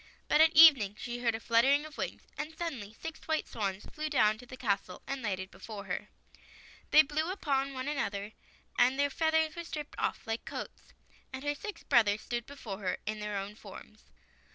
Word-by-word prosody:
But 305 - +5
at 320 0 +6
evening 275 -11 +8
she 240 0 -4
heard 235 -2 +1
a - - -4
fluttering 265 +6 +3
of 310 -1 -10
wings, - - -4
and 320 +1 -6
suddenly 270 -12 -4
six 325 -1 -6
white 315 -1 0
swans 200 -3 -3
flew 310 0 -4
down 215 -7 +3
to 245 - -12
the 255 - -9
castle, 195 -5 -2
and 275 -1 -4
lighted 190 -4 -3
before 210 -3 -8
her. 185 - -4 0.8
They 310 - +8
blew 310 +3 -1
upon 275 -7 -1
one 255 +1 -4
another, 205 -8 -2 0.5
and 255 +2 +5
their 285 0 +2
feathers 320 0 +2
were 340 - -5
stripped 300 -3 -6
off - - -1
like 225 0 -3
coats, - - -8 0.4
and 265 +1 -6
her 290 0 0
six 420 +8 -7
brothers 215 -5 +4
stood 240 -1 -4
before 230 -8 -7
her 190 -3 -1
in 215 0 -3
their 210 -1 -3
own 195 +1 -4
forms. 215 +1 -13
255 Hz, 195 wpm, -31 LUFS, 210-300 Hz, 0.8 s, evening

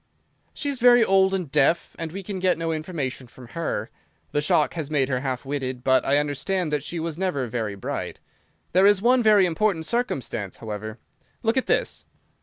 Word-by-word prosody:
"She 290 - -3
is 280 -3 0
very 245 -1 +6
old 190 -1 +4
and 180 -7 -3
deaf, 165 +6 +2
and 165 -1 -4
we 195 +3 -6
can 195 0 -5
get 185 -1 +2
no 165 0 -2
information 155 -6 -4
from 125 0 -14
her. 140 -9 -3 0.4
The 145 - +1
shock 150 - +2
has 160 -4 -4
made 140 -3 +1
her 130 -2 0
half 130 0 -3
witted, 130 -3 -3
but 130 -1 +3
I 140 - +2
understand 150 +4 -1
that 145 -2 0
she 170 +2 -4
was 165 0 -4
never 180 -9 -1
very 110 -3 -3
bright. 100 - -5 0.5
There 190 +3 +5
is 205 -1 +5
one 245 +4 +4
very 210 -4 +5
important 175 -1 0
circumstance, 135 - -2
however. 110 0 -6 0.5
Look 225 +1 +2
at 260 - 0
this!" - - 0
160 Hz, 195 wpm, -24 LUFS, 130-190 Hz, 0.5 s, very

